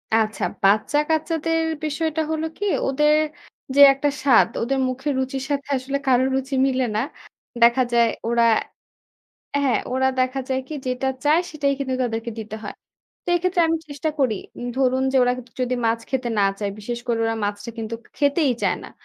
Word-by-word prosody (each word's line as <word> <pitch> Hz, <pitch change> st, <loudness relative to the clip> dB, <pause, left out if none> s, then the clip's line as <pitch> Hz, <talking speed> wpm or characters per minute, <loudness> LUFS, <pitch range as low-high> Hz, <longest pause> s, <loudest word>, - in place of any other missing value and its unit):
আচ্ছা, 220 Hz, -1 st, 0 dB, 0.2 s
বাচ্চা-কাচ্চাদের 310 Hz, -, +1 dB, 0.2 s
বিষয়টা 315 Hz, +1 st, -1 dB
হলো 315 Hz, 0 st, -1 dB
কি 410 Hz, -, -3 dB, 0.2 s
ওদের 300 Hz, +3 st, +3 dB, 0.6 s
যে 285 Hz, -, +6 dB
একটা 275 Hz, +2 st, 0 dB
স্বাদ 260 Hz, -5 st, +6 dB
ওদের 265 Hz, +4 st, 0 dB
মুখের 265 Hz, +3 st, -2 dB
রুচির 265 Hz, 0 st, -2 dB
সাথে 280 Hz, 0 st, -2 dB
আসলে 270 Hz, +2 st, -2 dB
কারো 255 Hz, -1 st, +4 dB
রুচি 270 Hz, +1 st, -2 dB
মিলে 260 Hz, -1 st, +1 dB
না। 215 Hz, -, +2 dB, 0.6 s
দেখা 240 Hz, +2 st, +5 dB
যায় 235 Hz, -1 st, +5 dB, 0.2 s
ওরা 235 Hz, 0 st, +3 dB, 1.2 s
হ্যাঁ, 265 Hz, -3 st, +2 dB
ওরা 265 Hz, 0 st, +2 dB
দেখা 255 Hz, +1 st, +1 dB
যায় 260 Hz, 0 st, +1 dB
কি -, -, -7 dB
যেটা 255 Hz, +1 st, -1 dB, 0.2 s
চায় 305 Hz, +3 st, +4 dB
সেটাই 280 Hz, -2 st, 0 dB
কিন্তু 265 Hz, -2 st, -2 dB
তাদেরকে 230 Hz, 0 st, -3 dB
দিতে 220 Hz, 0 st, -6 dB
হয়। 205 Hz, -, -6 dB, 0.5 s
তো -, -, -5 dB
এক্ষেত্রে 360 Hz, 0 st, +1 dB
আমি 330 Hz, 0 st, +1 dB
চেষ্টা 290 Hz, +2 st, -2 dB
করি, 245 Hz, -6 st, +2 dB, 0.4 s
ধরুন 260 Hz, 0 st, +2 dB
যে 270 Hz, -, +3 dB
ওরা 245 Hz, 0 st, +2 dB, 0.3 s
যদি 255 Hz, 0 st, 0 dB
মাছ 225 Hz, 0 st, +1 dB
খেতে 260 Hz, -2 st, -1 dB
না -, -, +4 dB, 0.2 s
চায়, 205 Hz, -1 st, -2 dB
বিশেষ 235 Hz, +3 st, -4 dB
করে 235 Hz, -1 st, 0 dB
ওরা 225 Hz, 0 st, 0 dB
মাছটা 205 Hz, +3 st, -3 dB
কিন্তু 225 Hz, 0 st, -4 dB, 0.2 s
খেতেই 285 Hz, 0 st, +2 dB
চায় -, -, +2 dB
না। -, -, -9 dB
265 Hz, 170 wpm, -22 LUFS, 235-290 Hz, 1.2 s, যে